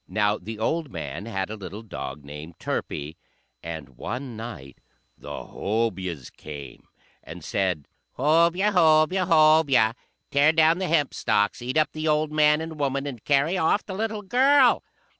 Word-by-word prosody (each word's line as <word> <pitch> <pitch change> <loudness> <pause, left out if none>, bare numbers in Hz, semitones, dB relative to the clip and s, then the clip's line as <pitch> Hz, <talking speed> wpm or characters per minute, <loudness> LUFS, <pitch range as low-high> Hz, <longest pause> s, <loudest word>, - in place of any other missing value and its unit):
Now 105 0 +1
the 110 +4 -7
old 155 +8 -1
man 80 - -6
had 95 -2 -3
a - - -4
little 105 +1 -8
dog 75 -9 -7
named 75 +3 -9
Turpie; 75 +2 -4 0.4
and 80 -3 -6
one 120 - -6
night 110 - -9 0.3
the - - -11 0.2
Hobyahs 95 - -3
came 70 -3 -10 0.3
and 85 +1 -10
said, 90 -7 -1 0.3
"Hobyah! 170 +8 +3
Hobyah! 170 +1 +4
Hobyah! 155 -8 +5 0.4
Tear 145 +2 +4
down 160 +2 +4
the 190 - -1
hempstalks, 140 -10 +1
eat 125 +4 -2
up 155 - +2
the 155 0 -4
old 150 0 +1
man 150 0 +4
and 160 -1 -7
woman, 140 -1 -1
and 125 -6 -7
carry 145 +6 +2
off 160 +6 +2
the 190 - -6
little 215 +1 -3
girl!" 255 +4 +4
140 Hz, 150 wpm, -25 LUFS, 95-160 Hz, 0.4 s, Hobyah